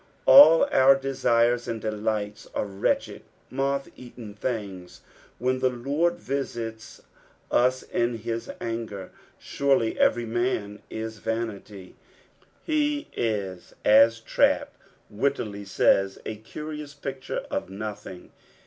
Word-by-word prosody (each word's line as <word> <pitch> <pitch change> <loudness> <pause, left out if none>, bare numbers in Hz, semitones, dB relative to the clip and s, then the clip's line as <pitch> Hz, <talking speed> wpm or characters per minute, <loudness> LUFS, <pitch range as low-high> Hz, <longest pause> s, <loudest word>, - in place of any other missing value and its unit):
Al) 165 - +9
our 135 +1 +7
desires 120 -3 +1
and 115 - -3
delights 105 0 -3
are - - 0
wretched 100 -1 -1 0.3
moth 135 +1 -1
eaten 120 -4 -11
thin^ 100 -5 -5 0.4
when 130 +2 0
the 130 - +2
Lord 140 +8 0
TiaitB 115 -5 -5 0.5
US 130 +1 +2
in 120 0 -1
his 115 +1 -5
anger. 115 -5 -5 0.2
'' - - -36
Surrl;/ 135 -5 +1
ecery 120 +1 +1
wan 105 +1 -11
i» - - -9
tanily." 110 -3 -5 0.7
He 295 -2 0
is 100 -5 -3
as 115 +2 +6
Trapp - - +1 0.4
wittily 105 -3 -2
aaya 95 0 +2
" - - -30
a 110 - -4
curious 150 +6 -8
picture 135 -2 -5
of - - -3
nothing." 100 -2 -8
115 Hz, 115 wpm, -26 LUFS, 105-135 Hz, 0.7 s, Al